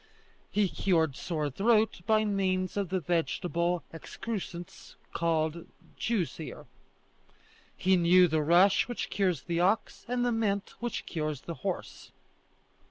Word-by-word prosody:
He 205 -1 +2
cured 165 -6 +1
sore 155 -4 -2
throat 215 - +2
by 215 0 +4
means 185 -2 0
of 200 -3 -1
the 185 0 0
vegetable 170 +1 0
excrescence 180 0 -7 0.2
called 165 0 0 0.3
Jew's 210 -10 -1
ear. 160 - -7 1.1
He 190 +1 +3
knew 180 +1 +6
the 155 -1 +1
rush 175 +6 +4
which 245 - -4
cures 180 -8 0
the 170 -1 -1
ox 200 +5 +1
and 245 0 0
the 245 - +2
mint 210 -3 -1
which 240 -1 -3
cures 155 -4 -3
the 170 - -6
horse. - - -5
180 Hz, 130 wpm, -29 LUFS, 165-205 Hz, 1.1 s, knew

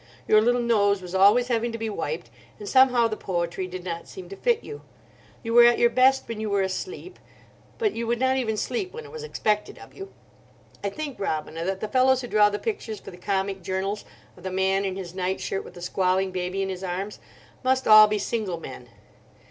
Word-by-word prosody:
Your 215 - +6
little 245 +2 +2
nose 205 -4 +3
was 180 -1 -9
always 205 +6 +5
having 235 0 0
to - - -3
be 225 0 -3
wiped, 345 - -4 0.3
and 420 - -9
somehow 255 - +5
the 215 - -3
poetry 175 -1 -3
did 185 0 -7
not 170 -2 -5
seem 180 -2 -10
to 195 - -7
fit 475 - +1
you. 435 - -8 0.6
You 230 0 -3
were 240 0 +8
at 240 0 +5
your 235 - +4
best 265 +2 +3
when 230 -2 -5
you 215 - -2
were 200 -1 +1
asleep, 365 - -5 0.6
but 430 -4 0
you 230 0 -4
would 235 +1 +1
not 260 0 +2
even 225 -5 -1
sleep 310 - -3
when 470 0 -8
it 440 - -12
was 470 0 -7
expected 210 - -1
of - - -14
you. 390 0 -9 0.7
I 200 - 0
think, 290 +5 -6
Robina, 160 -3 -3
that 190 +1 -2
the 215 - -2
fellows 260 +2 +3
who 245 - -6
draw 210 -2 +4
the 205 - -3
pictures 225 - -4
for 195 - -11
the - - -11
comic 195 +1 -2
journals 190 +3 -3 0.3
of - - -16
the 190 - -4
man 190 +1 +1
in 190 -1 -2
his 180 -3 -7
night 185 0 -2
shirt 195 - -3
with - - -13
the 175 - -9
squalling 185 +1 +1
baby 185 +1 -2
in 195 - -3
his 190 0 -5
arms 190 +3 -4 0.4
must 260 +1 +1
all 215 0 +9
be 210 0 0
single 200 -4 -2
men. 130 -5 -10
210 Hz, 225 wpm, -25 LUFS, 190-245 Hz, 0.7 s, all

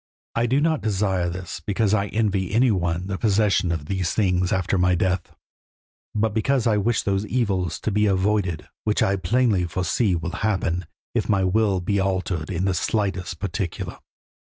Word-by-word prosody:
I 115 +1 +1
do 130 +4 +2
not 160 0 +1
desire 95 -4 0
this 90 +1 -6
because 100 +5 0
I 100 -1 +2
envy 100 -4 0
any 125 +1 +4
one 85 -2 -1
the 95 0 -4
possession 100 -4 +2
of 80 -3 -3
these 95 0 -1
things 90 -4 +1
after 95 0 +1
my 90 0 +3
death, 90 0 -1 0.8
but 110 0 +1
because 120 +3 +1
I 110 -3 +3
wish 115 +3 +1
those 100 0 0
evils 100 -8 0
to 110 - -1
be 105 +1 +2
avoided 95 -3 0 0.2
which 105 -1 +1
I 95 - +2
plainly 100 0 +2
foresee 95 +3 0
will 85 +1 -3
happen 90 -5 -1 0.3
if - - -1
my 100 -2 +3
will 95 0 +2
be 100 +3 0
altered 95 -4 -1
in 90 0 -1
the 95 - +2
slightest 95 -1 -1
particular." - - -4
95 Hz, 175 wpm, -23 LUFS, 90-105 Hz, 0.8 s, any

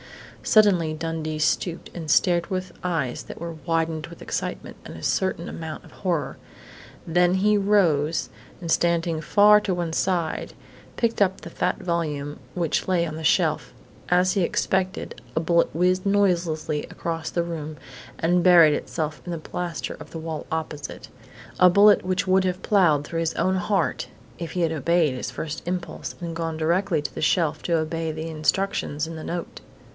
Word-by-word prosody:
Suddenly 180 -8 +4
Dundee 160 -1 -3
stooped 165 +3 -1
and 165 -3 -6
stared 170 +2 +3
with 185 -2 -3
eyes 165 -9 -1
that - - -10
were 170 0 -5
widened 165 -1 0
with 170 0 -11
excitement - - -4
and - - -9
a 80 - -11
certain 185 -3 0
amount 160 -1 -7
of - - -16
horror. 175 -5 -2 0.7
Then 175 +2 +3
he 210 +3 +3
rose, 175 -7 +2 0.3
and, 170 -2 -4
standing 170 -1 +1
far 210 +6 +6
to 190 -3 -1
one 170 -2 -3
side, 175 -2 -1 0.4
picked 230 -3 0
up 190 -1 +2
the - - -9
fat - - 0
volume 150 -4 -3 0.2
which 170 -4 0
lay 180 -2 +2
on 155 -2 -5
the 160 - -6
shelf. 160 -1 +2 0.4
As 180 +1 +3
he 200 - +1
had 170 - +2
expected, 185 -8 -1
a - - +3
bullet 170 +1 +2
whizzed 185 +3 +2
noiselessly 175 -7 +1
across 165 -1 -4
the 170 - 0
room 155 -3 -5 0.4
and 175 +1 +2
buried 170 -4 +7
itself 155 -2 -3
in 175 - -6
the 170 - -2
plaster 170 +1 -4
of - - -10
the 165 - -7
wall 160 -1 -5
opposite 155 -3 -5 0.5
a 180 - +8
bullet 200 +3 +6
which 185 0 0
would 190 0 +3
have 185 0 -2
ploughed 165 -8 +3
through 165 +2 -3
his 165 -1 -1
own 185 +2 +1
heart 195 +2 0 0.3
if 170 -2 -5
he 180 - -1
had 165 -1 +2
obeyed 160 -1 +2
his 125 - -4
first 155 -1 -5
impulse 180 -1 -4
and 170 -2 -5
gone 165 -1 -3
directly 170 0 +1
to - - -4
the - - -6
shelf 160 -1 +1
to 170 -1 +1
obey 160 0 -2
the 160 +1 -5
instructions 155 -1 -1
in 165 0 -7
the 160 - -7
note. 170 0 -5
170 Hz, 175 wpm, -24 LUFS, 160-185 Hz, 0.7 s, a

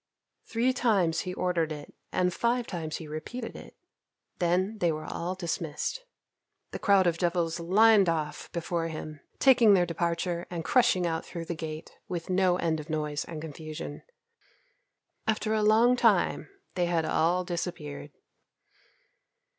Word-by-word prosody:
Three 240 +3 +1
times 195 -10 +2
he 180 - -4
ordered 170 -3 0
it 150 -1 -7 0.2
and 180 -1 +1
five 240 +3 +1
times 160 -6 -4
he 160 - -8
repeated 195 +11 -6
it. - - -11 0.6
Then 185 +5 +1
they 175 -3 +2
were 155 0 -5
all 180 +2 -3
dismissed. 170 - -3 0.7
The - - -5
crowd 200 -2 +4
of 170 -1 +1
devils 170 -1 0
lined 200 +2 +5
off 155 -2 -3
before 170 0 -2
him, 155 -2 -7 0.2
taking 240 -6 +6
their 180 -2 +3
departure 170 +1 -2
and 170 -2 -5
crushing 235 -8 +3
out 165 -1 -1
through 170 -2 -7
the 170 - -3
gate 155 -1 -7
with 175 0 -4
no 185 -1 +3
end 160 -3 0
of 150 +2 -9
noise 150 -1 -2
and 160 -2 -7
confusion. 155 -1 -7 1.3
After 220 0 0
a 215 - +2
long 225 +4 +5
time 250 - +2 0.2
they 175 -1 0
had 165 -2 +1
all 175 +4 +2
disappeared. 160 -5 -5
175 Hz, 145 wpm, -28 LUFS, 160-195 Hz, 1.3 s, taking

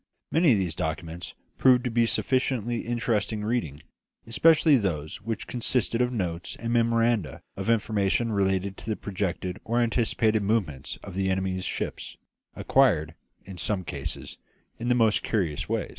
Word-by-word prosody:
Many 160 -4 +5
of - - +2
the 95 -2 0
documents 85 +1 -4 0.2
proved 125 -2 +5
to 125 - -2
be 115 0 +3
sufficiently 120 -2 0
interesting 110 -3 -1
reading, 105 - -2 0.4
especially 155 +5 +5
those 80 - -2
which 115 +2 -4
consisted 120 -1 0
of 125 0 +1
notes 90 -7 -3
and 115 0 -2
memoranda 115 -5 +1
of 95 +3 -4
information 110 0 +1
relating 95 -1 +1
to 105 - -9
the 110 - 0
projected 95 -2 -3
or 115 +1 0
anticipated 115 -2 +2
movements 100 -10 -1
of 100 - -8
the 95 +1 0
enemy's 95 -1 -1
ships, - - -4 0.4
acquired, 80 - +3 0.3
in 95 -2 -9
some 95 +4 -1
cases, - - -6 0.4
in 120 - -3
the 125 - +4
most 110 -3 +3
curious 90 -10 -1
way. - - -1
110 Hz, 150 wpm, -26 LUFS, 95-120 Hz, 0.4 s, Many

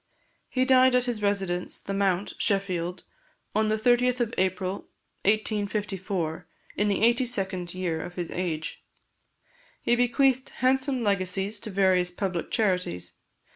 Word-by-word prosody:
He 255 0 +1
died 260 -1 +5
at 250 0 +3
his 240 -4 -2
residence, 195 -3 -1
The 195 - -5
Mount, 195 -1 0
Sheffield, 185 -3 0 0.5
on 215 0 +2
the 215 - +2
30th 245 +3 +3
of 240 -1 0
April 185 +1 -1 0.4
1854, 200 -5 -1 0.3
in 210 - +1
the 205 +1 +1
eighty 240 +2 +4
second 190 -6 -3
year 170 -4 -2
of 175 - -8
his 175 -2 -4
age. 165 -4 -3 1.0
He 240 - +2
bequeathed 255 +2 +2
handsome 260 0 +1
legacies 195 0 0
to 220 - -7
various 185 -2 +3
public 180 -1 -3
charities. 180 - 0
200 Hz, 135 wpm, -27 LUFS, 180-235 Hz, 1.0 s, died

